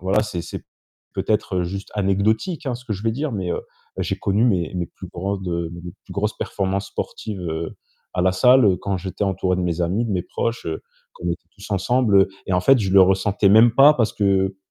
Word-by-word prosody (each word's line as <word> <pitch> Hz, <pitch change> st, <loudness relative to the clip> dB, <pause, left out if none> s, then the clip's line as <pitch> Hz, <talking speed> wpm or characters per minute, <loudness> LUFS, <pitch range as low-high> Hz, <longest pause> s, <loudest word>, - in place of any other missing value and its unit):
voilà, 95 Hz, +4 st, +2 dB
c'est 90 Hz, -6 st, -4 dB
c'est -, -, -8 dB, 0.5 s
peut-être 95 Hz, -4 st, 0 dB
juste 100 Hz, +3 st, -6 dB
anecdotique 110 Hz, -, 0 dB
hein, 125 Hz, -, -1 dB
ce 125 Hz, -, -14 dB
que 110 Hz, -, -3 dB
je 100 Hz, -, -8 dB
vais 115 Hz, -, +1 dB
dire, 140 Hz, +1 st, -3 dB
mais 95 Hz, -4 st, -3 dB
heu, -, -, -3 dB, 0.4 s
j'ai -, -, -1 dB
connu 100 Hz, +4 st, +1 dB
mes 90 Hz, -9 st, +1 dB
mes 90 Hz, -1 st, -2 dB
plus 95 Hz, -, -11 dB
grandes, 95 Hz, +1 st, -4 dB, 0.2 s
mes 85 Hz, 0 st, -8 dB
plus -, -, -11 dB
grosses 105 Hz, +2 st, -1 dB
performances 100 Hz, 0 st, -2 dB
sportives, 105 Hz, -4 st, -5 dB
heu, 80 Hz, 0 st, -4 dB, 0.4 s
à 90 Hz, -, +1 dB
la 95 Hz, -, +4 dB
salle 110 Hz, -1 st, +5 dB
quand 100 Hz, -1 st, -2 dB
j'étais 95 Hz, +2 st, -3 dB
entouré 95 Hz, -1 st, 0 dB
de 90 Hz, -, -1 dB
mes 90 Hz, 0 st, -1 dB
amis, 95 Hz, +8 st, 0 dB
de 105 Hz, -, -2 dB
mes 90 Hz, -, 0 dB
proches, 115 Hz, +5 st, -3 dB
heu, 80 Hz, -, -3 dB, 0.3 s
qu'on 90 Hz, -, -8 dB
était 85 Hz, -, -4 dB
tous 100 Hz, +1 st, -11 dB
ensemble, 105 Hz, +2 st, +2 dB
heu 95 Hz, -, -1 dB, 0.2 s
et 95 Hz, -, -2 dB
en 90 Hz, -, +3 dB
fait, 135 Hz, +8 st, +5 dB
je 95 Hz, -2 st, -1 dB
le 100 Hz, -, +8 dB
ressentais 95 Hz, +2 st, +2 dB
même 110 Hz, +3 st, +7 dB
pas 145 Hz, +3 st, +7 dB
parce 115 Hz, -5 st, +1 dB
que 95 Hz, -1 st, +1 dB
100 Hz, 220 wpm, -22 LUFS, 90-110 Hz, 0.5 s, le